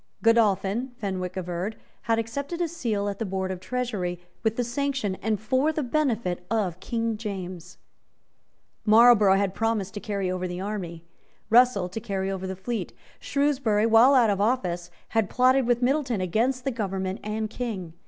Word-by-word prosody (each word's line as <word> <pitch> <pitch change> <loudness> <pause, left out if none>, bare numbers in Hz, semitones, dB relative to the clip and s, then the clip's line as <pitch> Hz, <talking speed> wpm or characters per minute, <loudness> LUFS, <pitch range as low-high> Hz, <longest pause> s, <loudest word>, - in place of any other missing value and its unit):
Godolphin, 230 +1 +2
Fenwick 185 -3 -4
averred, 180 +4 -3 0.3
had 225 - +4
accepted 280 +9 -3
a 345 - +1
seat 280 -10 -2
at 200 -1 -4
the - - -1
Board 190 -2 -2
of 185 - -5
Treasury, 200 -6 -3 0.2
with 220 -1 0
the 245 - 0
sanction 260 -3 -1
and 220 -2 0
for 260 +8 +1
the 310 -1 -2
benefit 235 - 0
of 195 -6 -1
King 230 +1 -2
James. 185 -5 -6 1.1
Marlborough 215 -3 +6
had 195 -1 0
promised 220 -3 -1
to 205 - -5
carry 200 -4 -2
over 185 0 -2
the 180 0 -5
army, 185 -5 -5 0.5
Russell 235 -6 +5
to 185 +5 -5
carry 195 -2 -2
over 190 -1 -4
the 190 - -4
fleet. 220 +5 -4 0.3
Shrewsbury, 265 -7 +1
while 230 +5 +6
out 235 -5 +5
of 200 0 -1
office, 180 -7 0 0.2
had 225 -4 +1
plotted 255 0 +3
with 245 0 +2
Middleton 260 -4 +1
against 230 +8 0
the 270 - -1
government 195 -4 -3
and 215 +1 -2
King. 210 -8 -5
215 Hz, 165 wpm, -26 LUFS, 190-245 Hz, 1.1 s, Marlborough